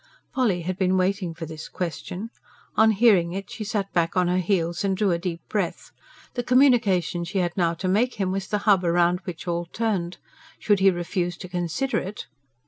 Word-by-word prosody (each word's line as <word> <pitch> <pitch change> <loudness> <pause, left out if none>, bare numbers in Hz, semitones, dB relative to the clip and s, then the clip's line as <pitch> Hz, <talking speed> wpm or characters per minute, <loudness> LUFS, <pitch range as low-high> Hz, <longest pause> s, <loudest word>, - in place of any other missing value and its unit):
Polly 210 -10 +1
had 185 +2 -3
been 185 0 +2
waiting 185 -2 0
for 165 0 -6
this 155 0 -8
question. 180 +5 -5 0.4
On 220 0 +6
hearing 200 -6 +4
it, 195 +1 -6
she 215 - -5
sat 200 -2 -3
back 170 +1 +1
on 180 -1 +3
her 180 +1 +2
heels 175 -2 0
and 195 -1 0
drew 205 -2 +2
a 170 - 0
deep 170 -1 -4
breath. 195 -5 -3 0.4
The 245 - -1
communication 235 - +3
she 180 +4 -4
had 175 -2 0
now 170 -3 +1
to 185 +3 -3
make 220 +7 +2
him 195 -3 -1
was 195 0 -3
the 210 - 0
hub 200 -4 +5
round 175 +1 +3
which 180 -1 -7
all 170 0 -1
turned. 190 -4 -2 0.4
Should 205 -2 +2
he 195 0 +6
refuse 175 0 -2
to 185 - -8
consider 180 - -1
it.... 200 +3 -6
185 Hz, 200 wpm, -24 LUFS, 175-205 Hz, 0.4 s, On